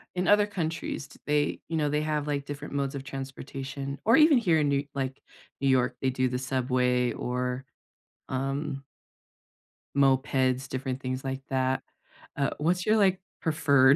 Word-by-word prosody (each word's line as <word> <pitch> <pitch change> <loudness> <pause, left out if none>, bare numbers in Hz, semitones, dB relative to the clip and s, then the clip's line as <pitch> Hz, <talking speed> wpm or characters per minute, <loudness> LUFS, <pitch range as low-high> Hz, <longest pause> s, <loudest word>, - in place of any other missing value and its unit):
In 180 0 0
other 205 0 +5
countries, 165 -7 -3
t - - -17
they 145 0 +1
you 165 - -1
know, 150 -2 +1
they 150 +1 +1
have, 150 -1 -1
like, 140 -1 -1
different 145 0 -6
modes 140 -1 -1
of 135 - -5
transportation, 135 0 -6
or 230 +4 +6
even 305 -2 +7
here 175 -9 +3
in 145 -1 +2
New 140 0 +1
like, 135 -1 -3 0.4
New 135 - +2
York, 130 -1 +3
they 130 - +2
do 130 0 +1
the 125 0 -2
subway 125 -1 +1
or, 125 +2 -2 0.6
um 135 +1 -2 1.1
mopeds, 130 -1 +2
different 130 0 -3
things 130 0 -3
like 135 0 -3
that. 130 0 +1 0.5
Uh, 140 -1 +2
what's 175 +4 +1
your, 215 +1 +4
like, 190 -3 +4 0.2
preferred 140 -4 +5
135 Hz, 165 wpm, -28 LUFS, 130-150 Hz, 1.1 s, even